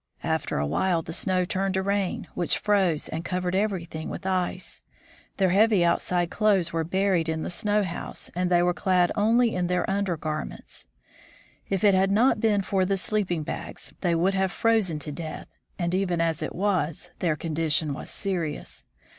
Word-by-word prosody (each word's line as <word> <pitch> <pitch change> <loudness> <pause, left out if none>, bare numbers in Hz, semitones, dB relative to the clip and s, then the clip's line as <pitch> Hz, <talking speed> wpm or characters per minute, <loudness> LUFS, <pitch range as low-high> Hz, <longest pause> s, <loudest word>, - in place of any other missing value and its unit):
After - - -1
a 75 - 0
while 165 - +1
the 165 - -6
snow 185 0 +1
turned 190 +1 -1
to 190 - 0
rain, 200 -1 -1
which 175 - +1
froze 190 -7 +1
and 160 +1 -4
covered 180 0 -2
everything 185 -5 -2
with - - -7
ice. 185 -1 -2 0.6
Their 190 -2 +3
heavy 205 -2 +4
outside 175 0 +1
clothes 195 -6 +2
were 165 -1 0
buried 185 -1 +1
in 160 0 -2
the - - -4
snow 210 +3 +1
house, 175 -3 -5
and 180 +1 0
they 175 -1 +4
were 180 0 +2
clad 180 -1 +2
only 230 +3 +3
in 180 -1 0
their 180 0 0
under 195 -3 0
garments. 155 -1 -5 0.8
If 195 -1 -1
it 205 -2 +6
had 190 +1 +3
not 225 +7 +3
been 210 -3 +2
for 190 0 +1
the 195 +1 +1
sleeping 185 -5 0
bags, - - -6
they 175 -3 +2
would 180 +4 +2
have 190 -1 +1
frozen 220 -9 +2
to 150 0 -6
death, 155 +1 -6 0.3
and 175 -1 -1
even 185 -2 0
as 165 -2 0
it - - -4
was, 180 -5 -1
their 165 -4 +1
condition 155 -1 0
was - - -7
serious. 175 -7 -3
180 Hz, 180 wpm, -26 LUFS, 165-195 Hz, 0.8 s, it